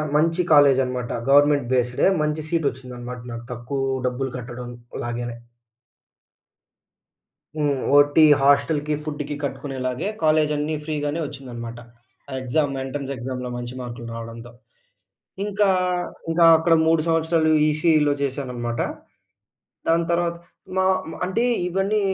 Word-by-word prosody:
మంచి 165 +3 +2
కాలేజ్ 140 -3 +6
అన్నమాట. 125 -1 -4 0.2
గవర్నమెంట్ 145 -2 +5
బేస్డ్‌డే 125 +3 +2 0.2
మంచి 150 +1 -1
సీట్ 165 -2 0
వచ్చింది 130 0 -10
అన్నమాట 125 0 -7
నాకు 115 0 -7
తక్కువ 125 +3 -4 0.3
డబ్బులు 130 +2 -2
కట్టడంలాగేనే. 120 -1 -6 2.2
హ్మ్. 145 -2 0 0.2
ఓటీ 145 +2 +5 0.2
హాస్టల్‌కి, 145 +2 +3
ఫుడ్డుకి 145 -1 -4
కట్టుకునేలాగే 135 0 -3 0.2
కాలేజన్నీ 155 0 +2
ఫ్రీగానే 150 0 -2
ఒచ్చిందనమాట. 120 -4 -8 0.5
ఆ - - -9
ఎగ్జామ్ 140 +2 0
ఎంట్రన్స్ 140 +1 -5
ఎగ్జామ్‌లో 125 0 -5
మంచి 120 0 -6
మార్కులు 120 -1 -7
రావడంతో. 115 +1 -8 0.9
ఇంకా 205 0 +1 0.6
ఇంకా 165 +1 +4
అక్కడ 165 +1 +2
3 165 -1 +4
సంవత్సరాలు 165 0 +2 0.2
ఈసీఈలో 155 -1 +3
చేశాననమాట. 125 -4 -3 1.1
దాని 165 +1 +3
తర్వాత, 170 0 +1 0.4
మా 190 - +3 0.3
మ్ - - -7
అంటే, 190 +6 0 0.2
ఇవన్నీ 195 +4 0
140 Hz, 110 wpm, -23 LUFS, 125-155 Hz, 2.2 s, కాలేజ్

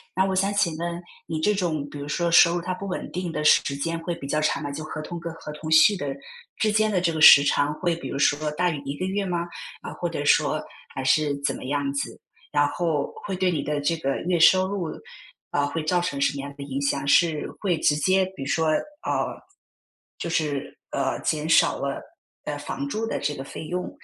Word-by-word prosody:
那 190 - +3
我 190 -1 0
想 195 +2 +1
请 170 -6 +1
问， 170 +1 -4 0.2
你 160 -1 -3
这 210 +7 +2
种 155 -6 -1
比 145 - -9
如 145 0 -6
说 170 +3 0
收 170 0 +6
入 175 - -1
它 185 +1 -3
不 200 - -7
稳 185 - -5
定 180 -1 -3
的 150 - -3
时 140 -2 +4
间 165 +4 -2
会 170 +1 -3
比 155 -5 -7
较 150 +2 0
长 155 -2 0
嘛？ 145 -1 -4
就 155 +2 -6
合 155 0 -6
同 170 +2 -6
跟 170 -1 -6
合 155 -2 -9
同 155 +1 -7
续 185 +5 +6
的 145 - -4 0.5
之 215 -1 +2
间 215 0 +2
的 180 -3 +1
这 170 -2 +2
个 160 - -3
时 140 -3 +10
长， 145 +1 +1
会 170 +1 -1
比 170 - -7
如 140 - -4
说 150 +1 +2
大 180 +4 +1
于 150 -4 -3
1 140 +1 -3
个 185 - -2
月 200 +1 -1
吗？ 175 -1 -2 0.3
啊， - - -7
或 - - -3
者 - - -3
说 - - +3 0.3
还 135 - -4
是 145 +2 +2
怎 - - 0
么 - - -9
样 140 +1 -1
子？ 140 - -4 0.3
然 145 -1 +3
后 160 -3 -1
会 195 - -3
对 185 0 +1
你 155 -5 -1
的 150 -1 -2
这 165 +3 0
个 135 -3 -1
月 180 -1 +2
收 185 +3 +6
入， 190 -5 -3 0.6
啊， 145 0 +1
会 155 +3 -3
造 180 +2 +2
成 140 -6 -3
什 140 - +2
么 140 - -4
样 140 0 -7
的 140 - -6
影 140 0 -3
响？ 140 0 -1
是 160 0 +3
会 185 -5 +1
直 145 - +3
接 185 +5 +2
比 135 - -6
如 - - -5
说， 160 0 +1
呃， 300 - -2 0.8
就 170 - -4
是， 150 -4 -2
呃， - - -1
减 155 0 -1
少 165 - +4
了， 140 0 -3 0.4
呃， - - -3
房 280 - -5
租 225 -4 -2
的 - - -2
这 145 +1 -1
个 135 - -6
费 155 - -8
用， 180 +2 -3
160 Hz, 255 characters per minute, -25 LUFS, 145-180 Hz, 0.8 s, 时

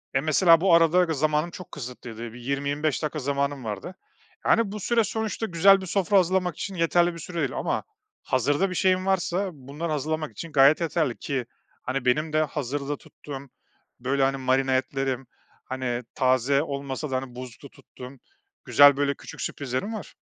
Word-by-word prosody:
Eee, 135 - +3
mesela, 165 +2 +5
bu 185 -3 +4
arada 170 +2 +5
g 165 - -1
zamanım 155 +3 0
çok 180 -1 -10
kısıtlıydı. 120 -4 -8
Bir 120 - -10
20-25 140 +4 -1
dakika 150 +1 -2
zamanım 140 0 -1
vardı. 110 - -5 0.5
Yani, 225 -3 +3
bu 210 - -5
süre 230 +3 +2
sonuçta 220 +1 -3
güzel 195 +1 +5
bir - - -6
sofra 195 +2 +2
hazırlamak 180 -2 +1
için 195 -2 -5
yeterli 175 +1 +2
bir 170 - -9
süre 170 +2 -8
değil 140 -5 -1
ama - - -1 0.4
hazırda 145 +9 +1
bir 180 - -5
şeyim 185 0 +2
varsa 190 0 0
bunları 145 +4 -6
hazırlamak 155 +1 -2
için 165 - -8
gayet 145 +3 +5
yeterli. 155 -6 0
Ki, 135 -4 -3 0.4
hani, 130 0 -3
benim 150 +5 +1
de 155 - +3
hazırda 145 0 -3
tuttuğum, 140 -2 -10 0.5
böyle, 135 +2 0
hani, 135 0 +1
marine 130 0 +1
etlerim, 135 0 -2 0.4
hani, 125 -2 -3
taze 130 +2 +2
olmasa 140 0 -4
da, - - 0
hani, 130 -2 -6
buzlukta 125 +2 -9
tuttuğum 125 0 -12 0.5
güzel, 145 -1 +7
böyle 145 0 +1
küçük - - -10
sürprizlerim 140 - -3
var. 215 - -8
145 Hz, 170 wpm, -25 LUFS, 135-170 Hz, 0.5 s, güzel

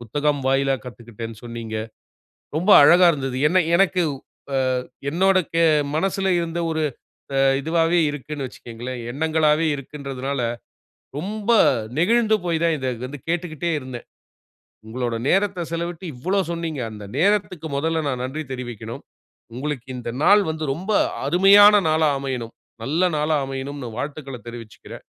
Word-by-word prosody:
புத்தகம் 145 +5 -1
வாயிலா 135 0 +2
கத்துக்குட்டேன்னு 115 -2 -9
சொன்னீங்க. 115 -2 -6 0.8
ரொம்ப 180 +6 0
அழகா 175 +4 +7
இருந்தது. 135 -3 -3
என்ன 185 0 +3
எனக்கு 185 -2 +3 0.5
அ - - +2 0.5
என்னோட 190 +4 +3 0.2
கே 165 - +3 0.3
மனசுல 195 +3 0
இருந்த 170 0 -3
ஒரு 160 0 -1 0.6
அ - - +3 0.2
இதுவாவே 165 +3 +2
இருக்குன்னு 145 0 -6
வச்சுக்கோங்களேன், 120 +1 -8
எண்ணங்களாவே 155 +2 +2
இருக்குன்றதனால, 140 -1 -5 0.8
ரொம்ப 210 +6 -2 0.5
நெகிழ்ந்து 220 +5 +3
போய் 165 -1 0
தான், 165 -1 +2
இத 130 -1 -2 0.2
வந்து 145 0 -8
கேட்டுக்கிட்டே 170 -1 -2
இருந்தேன். 130 -2 -8 0.8
உங்களோட 120 0 -3
நேரத்தை 195 -2 +1
செலவிட்டு 170 +1 -4
இவ்வளோ 185 +11 0
சொன்னீங்க. 165 -4 -3
அந்த 105 -1 -9
நேரத்துக்கு 185 -3 +1
முதல்ல 160 +1 0
நான் 125 -2 -2
நன்றி 150 +5 -4
தெரிவிக்கணும். 120 -3 -7 0.5
உங்களுக்கு 135 -1 -4
இந்த 120 -1 -5
நாள் 205 +3 +6
வந்து 155 0 -4
ரொம்ப 190 +7 -4 0.3
அருமையான 200 +6 +7
நாளா 155 0 +3
அமையனும். 125 -4 -4 0.3
நல்ல 165 +9 +1
நாளா 150 +1 +1
அமையனும் 135 +1 -5 0.2
வாழ்த்துக்கள 140 -2 -5
தெரிவிச்சுக்குறேன். 115 -4 -10
150 Hz, 125 wpm, -22 LUFS, 130-175 Hz, 0.8 s, அழகா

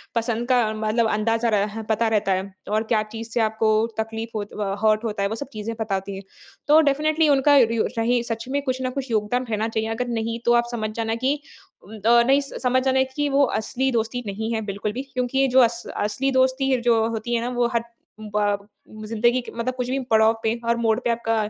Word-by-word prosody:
पसंद 230 +1 -1
का 250 -1 +4
मतलब 220 +1 0
अंदाज़ा 225 +2 +1
रह 210 +1 0
पता 225 +1 +2
रहता 200 -2 +1
है। 190 +1 -3 0.2
और 215 +1 +1
क्या 215 - +3
चीज़ 225 0 -6
से 240 - -1
आपको 220 0 +2 0.2
तकलीफ़ 225 +1 -3
होत 205 -1 -5
अ, 200 -2 -2
हर्ट 215 +1 +3
होता 210 -3 -2
है 200 - +1
वो 220 - -3
सब - - -14
चीज़ें 215 +1 -4
पता 215 -3 -1
होती 195 +1 -4
हैं। 195 - -8 0.4
तो 300 +2 +7
डेफिनिटली 310 +2 +1
उनका 285 +1 +5
री 230 -3 +4
ओ - - +2
रहे 240 +2 +2
सच 230 0 -4
में 285 +1 0
कुछ 260 -2 -2
ना 255 - -1
कुछ 265 -1 -5
योगदान 220 +4 0
रहना 215 0 0
चाहिए। 220 0 -2
अगर 235 +2 -2
नहीं, 230 -1 -2
तो 240 - +4
आप 240 0 +4
समझ 220 -3 -2
जाना 225 -1 -1
कि 275 +2 +3 0.7
अ, 235 +1 +6
नहीं 270 +3 +3
स 275 - -8
समझ 255 +1 +3
जाना 265 0 +3
कि 290 -1 0
वो 280 +1 +3 0.2
असली 265 +4 -1
दोस्ती 230 +1 -1
नहीं 220 +3 -3
है 225 - 0
बिल्कुल 205 +1 -3
भी। 255 - -3
क्योंकि 250 +1 -1
ये 270 - +4
जो 260 0 +4
अस 235 -1 +3
असली 210 +7 0
दोस्ती 260 +1 +2
जो 230 -2 +3
होती 230 +1 -3
है 230 - 0
ना 240 - -2
वो 240 -1 +2
हर 235 - +1 0.4
ब 205 -1 -1 0.4
ज़िन्दगी 235 +3 +2
के - - -10
मतलब 245 +2 -2
कुछ 250 -1 -3
भी 265 +1 0
पड़ाव 220 0 +5
पे, 220 - +2
हर 235 0 +2
मोड़ 225 -1 +1
पे 240 - 0
आपका 230 -1 0
230 Hz, 230 wpm, -23 LUFS, 220-250 Hz, 0.7 s, तो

